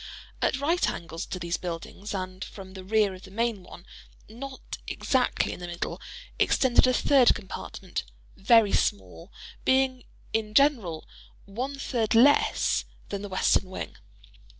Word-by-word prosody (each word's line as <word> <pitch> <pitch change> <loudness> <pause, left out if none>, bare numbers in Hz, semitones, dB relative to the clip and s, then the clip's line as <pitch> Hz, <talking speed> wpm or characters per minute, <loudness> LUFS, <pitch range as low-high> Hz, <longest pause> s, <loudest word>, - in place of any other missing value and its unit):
At 265 - +1
right 330 +5 +2
angles 165 0 -6
to - - -4
these 170 -1 -2
buildings, 180 +4 -6
and 185 0 -5
from 190 -2 -10
the 190 -1 -8
rear 210 0 +2
of 185 - -11
the 190 - -12
main 225 0 -1
one—not 230 +8 -11
exactly 255 -2 0
in - - -9
the 175 - -6
middle—extended 255 - 0
a 255 - +3
third 265 -2 +5
compartment, 140 - -6 0.3
very 220 0 +5
small—being, 250 - -1 0.3
in 215 -1 -1
general, 225 - +3 0.4
one 255 +8 -4
third 230 -5 -1
less 275 +6 +4 0.2
than 200 -1 -4
the 205 - -6
western 185 0 +2
wing. 185 - -6
210 Hz, 130 wpm, -27 LUFS, 185-255 Hz, 0.4 s, third